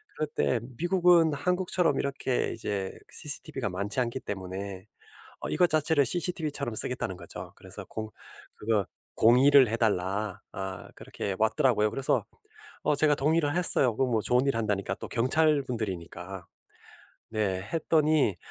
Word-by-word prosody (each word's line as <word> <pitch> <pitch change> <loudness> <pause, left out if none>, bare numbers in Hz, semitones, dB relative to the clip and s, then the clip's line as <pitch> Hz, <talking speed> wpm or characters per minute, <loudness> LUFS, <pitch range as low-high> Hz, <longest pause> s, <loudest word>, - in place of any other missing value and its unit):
그럴 155 - -2
때 125 - +1 0.2
미국은 175 -1 +4
한국처럼 180 -1 +1
이렇게 135 -2 -1
이제 100 -4 -3 0.2
cctv가 140 -5 -2
많지 100 +6 -2
않기 120 +1 -3
때문에 95 0 -6 0.6
어 - - -5
이것 180 -1 +3
자체를 155 -1 +3
cctv처럼 155 -6 -1
쓰겠다는 105 -6 +1
거죠. 85 -2 -8
그래서 - - -9
공 110 -1 -6 0.5
그거 105 -2 0 0.3
"동의를 130 +3 +6
해달라." 105 -2 -1
아 95 -1 -6
그렇게 100 - -5
왔더라고요. 110 0 +2
그래서 135 +3 0 0.6
어 - - +3
제가 150 0 +4
동의를 150 +1 +1
했어요. 135 -9 +4
그 135 - +2
뭐 120 -4 0
좋은 125 +4 +2
일 140 - +1
한다니까 105 -3 -1
또 - - -8
경찰분들이니까. 125 - -1 0.9
네. 100 -4 -1
했더니 155 - +2
125 Hz, 320 characters per minute, -28 LUFS, 105-150 Hz, 0.9 s, 동의를